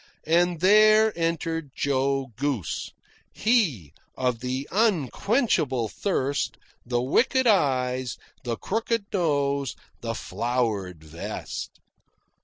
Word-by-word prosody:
And 170 +1 +2
there 215 +3 +6
entered 165 -2 -2
Joe 135 -1 0
Goose 130 - -2 0.4
he 165 - +1 0.2
of 125 -3 0
the 130 +3 -3
unquenchable 190 - +1
thirst, 145 - -1 0.3
the 120 0 -1
wicked 260 - +2
eyes, 130 - +2 0.3
the 120 -2 -2
crooked 225 0 -1
nose, 140 -6 0 0.2
the 115 -1 -4
flowered 110 -10 -2
vest. 80 +2 -6
140 Hz, 90 wpm, -26 LUFS, 125-190 Hz, 0.4 s, there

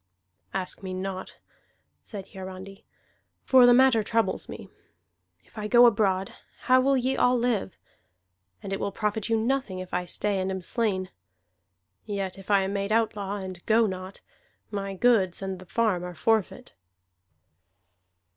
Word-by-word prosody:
"Ask 190 -1 -3
me 185 -1 -5
not," 185 0 -5 0.6
said 200 -4 -8
Hiarandi. 190 +1 -9 0.6
"For 255 -2 +6
the - - +7
matter 260 -3 +5
troubles 225 +2 -1
me. - - -8 0.8
If 220 - -12
I 210 - -3
go 240 +2 +7
abroad, 195 -4 +2 0.3
how 255 0 +4
will 270 +1 +3
ye 260 +1 0
all 250 0 +3
live? 235 -7 -1 0.9
And 195 - -4
it 195 - -2
will 200 - -2
profit 210 +1 -2
you 225 - +3
nothing 230 -4 -1
if 185 0 -8
I 180 0 -1
stay 200 +2 -1
and 185 0 -1
am 190 -1 -4
slain. 190 -2 -1 0.9
Yet 195 -3 -4
if 195 - -14
I 200 -2 +4
am 190 +1 -3
made 200 +1 -2
outlaw, 210 -3 0
and 185 -3 -7
go 225 +1 +4
not, 185 -1 -6 0.5
my 195 -1 -4
goods 195 -5 +2
and 190 -1 -4
the 185 - -13
farm 215 -4 0
are 180 0 -7
forfeit." 220 +3 0
200 Hz, 155 wpm, -26 LUFS, 190-225 Hz, 0.9 s, the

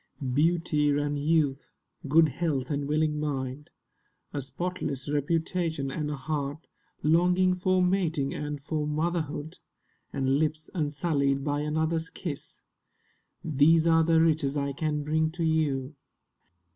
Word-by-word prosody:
Beauty 155 0 +2
and 145 0 -1
youth, 145 -2 +1 0.4
good 160 +2 +5
health 140 -2 -2
and 140 -1 -1
willing 150 0 +1
mind, 140 -1 -3 0.6
A 145 - -2
spotless 145 -1 -3
reputation, 160 0 -1
and 150 +1 -3
a 150 - -2
heart 145 +2 -4 0.4
Longing 180 +4 +4
for 185 0 +2
mating 170 -7 +1
and 150 -1 -4
for 150 +1 -2
motherhood, 155 -1 -2 0.5
And 135 +1 +1
lips 155 0 -2
unsullied 145 -3 0
by 145 0 0
another's 160 +2 -1
kiss— 155 -6 -6 0.8
These 160 +2 +4
are 165 -1 +5
the 165 0 +4
riches 155 -3 +2
I 140 0 -1
can 150 0 -2
bring 155 +1 +1
to 170 -1 -3
you. 150 -3 0
150 Hz, 125 wpm, -28 LUFS, 145-165 Hz, 0.8 s, good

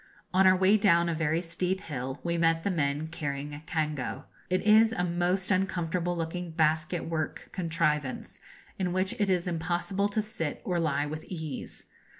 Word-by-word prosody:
On 190 +1 +6
our 185 - +7
way 190 +3 +5
down 170 -5 +4
a - - 0
very 160 +1 0
steep 180 +2 -2
hill 135 -2 -5
we 170 0 0
met 165 -1 +2
the 200 - +1
men 145 -2 0
carrying 145 -3 -4
a 145 - -7
cango. 150 -5 -2 0.3
It 185 0 +1
is 220 +1 +6
a 180 - -1
most 180 +3 0
uncomfortable 175 -2 0
looking 170 +2 -3
basket 160 +2 +1
work 160 -2 -3
contrivance, 155 -6 -1 0.4
in 180 -2 0
which 185 +3 +1
it 205 -2 +2
is 180 -1 +1
impossible 175 +4 -1
to 215 +1 +1
sit 165 -8 -3
or 180 -2 0
lie 145 -3 +1
with 155 +1 -5
ease. 160 -7 -6
170 Hz, 170 wpm, -29 LUFS, 155-185 Hz, 0.4 s, our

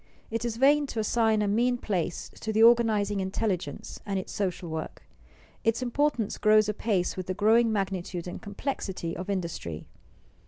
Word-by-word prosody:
It 230 +1 -2
is 235 -2 -2
vain 285 +3 +4
to 230 - -4
assign 220 -1 +2
a - - 0
mean 240 +4 +2
place 180 -7 -2
to 220 - -3
the 220 +1 +4
organizing 220 -4 +4
intelligence 190 -5 -3
and 200 -1 -2
its 185 - -5
social 185 -3 -2
work. 160 -1 -6 0.6
Its 225 +3 +1
importance 250 -3 0
grows 215 0 +5
apace 205 -3 0
with 185 -1 -5
the 185 - -2
growing 225 +3 +4
magnitude 185 -4 -2
and 175 - -6
complexity 195 -6 -4
of 185 +3 -6
industry. 170 - -4
210 Hz, 160 wpm, -28 LUFS, 185-230 Hz, 0.6 s, grows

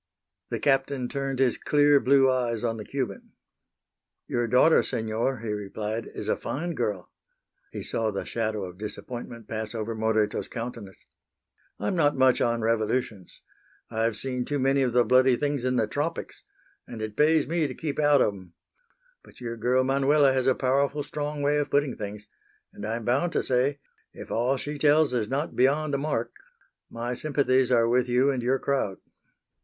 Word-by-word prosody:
The - - -2
Captain 135 -2 +1
turned 135 0 -3
his 130 -2 +1
clear 145 -1 +4
blue 135 0 +4
eyes 120 -3 0
on 115 -1 -1
the 105 - -6
Cuban. 135 +2 -5 0.9
"Your 120 -1 -1
daughter, 125 +8 +5
Senor," 110 +3 -2
he 115 - -5
replied, 105 +2 -4
"is - - -5
a - - +2
fine 170 +5 -4
girl." 105 - -3 0.6
He - - -6
saw 110 -1 -1
the 100 -2 -4
shadow 110 -3 -2
of 90 +1 -11
disappointment 115 +1 -7
pass 110 0 -4
over 110 0 -3
Moreto's 110 -1 0
countenance. 115 -5 -7 0.7
"I'm 105 - -1
not 145 -4 +2
much 130 -1 +4
on 115 -1 +1
revolutions. 110 -3 -2 0.5
I've 110 -1 0
seen 125 +2 -2
too 145 +3 -2
many 135 +1 +2
of 130 -2 +1
the 120 -1 +4
bloody 130 +2 +5
things 145 -2 -1
in 130 0 0
the 115 -3 +2
tropics, 145 +9 -4 0.5
and 115 - -8
it 110 -1 -5
pays 155 +3 +4
me 165 -2 0
to 130 - -7
keep 150 -2 -4
out 145 -2 +4
of 105 - 0
'em. 95 -3 -13 0.7
But - - -18
your 120 -2 -5
girl 125 +3 +2
Manuela 140 +1 +3
has 130 -1 0
a 130 - +4
powerful 140 +2 +1
strong 150 0 -4
way 145 +1 +2
of 145 - -1
putting 140 -2 +1
things, 105 0 -7 0.5
and 105 - -6
I'm 115 0 -3
bound 140 +9 +1
to - - +1
say, 130 +3 +1 0.4
if - - -10
all 125 +4 +1
she 145 +2 -5
tells 150 -1 +4
is 110 -3 -1
not 145 +4 -2
beyond 145 +4 +2
the 140 - +1
mark, 140 -5 -2 0.6
my 120 +1 -4
sympathies 130 -2 +1
are 115 -2 +4
with 125 +1 +2
you 130 +3 +3
and 130 -2 -2
your 125 +3 +1
crowd." 130 -9 -1
125 Hz, 180 wpm, -26 LUFS, 115-140 Hz, 0.9 s, daughter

